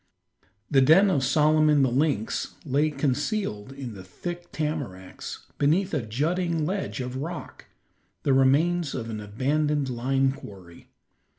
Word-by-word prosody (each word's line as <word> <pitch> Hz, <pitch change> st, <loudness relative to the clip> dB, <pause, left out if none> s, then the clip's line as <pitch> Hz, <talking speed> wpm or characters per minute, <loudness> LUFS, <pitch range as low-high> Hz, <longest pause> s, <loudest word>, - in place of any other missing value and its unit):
The 135 Hz, -2 st, +5 dB
den 175 Hz, +9 st, +6 dB
of 140 Hz, -6 st, +1 dB
Solomon 150 Hz, 0 st, +4 dB
the 130 Hz, -, +2 dB
lynx 135 Hz, -5 st, 0 dB
lay 145 Hz, +2 st, +2 dB
concealed 140 Hz, -, -2 dB
in 135 Hz, -4 st, -7 dB
the 95 Hz, -2 st, -10 dB
thick 175 Hz, -, -7 dB
tamaracks, 140 Hz, -, -5 dB
beneath 175 Hz, +7 st, +2 dB
a 150 Hz, -, +1 dB
jutting 160 Hz, +8 st, -1 dB
ledge 190 Hz, -5 st, -2 dB
of 125 Hz, +1 st, -4 dB
rock, 160 Hz, +5 st, -6 dB, 0.6 s
the 140 Hz, -, +3 dB
remains 145 Hz, +5 st, +3 dB
of 115 Hz, -2 st, -4 dB
an 110 Hz, -, -4 dB
abandoned 140 Hz, +7 st, 0 dB
lime 135 Hz, +2 st, +1 dB
quarry. 95 Hz, -9 st, -12 dB
140 Hz, 130 wpm, -26 LUFS, 125-155 Hz, 0.6 s, den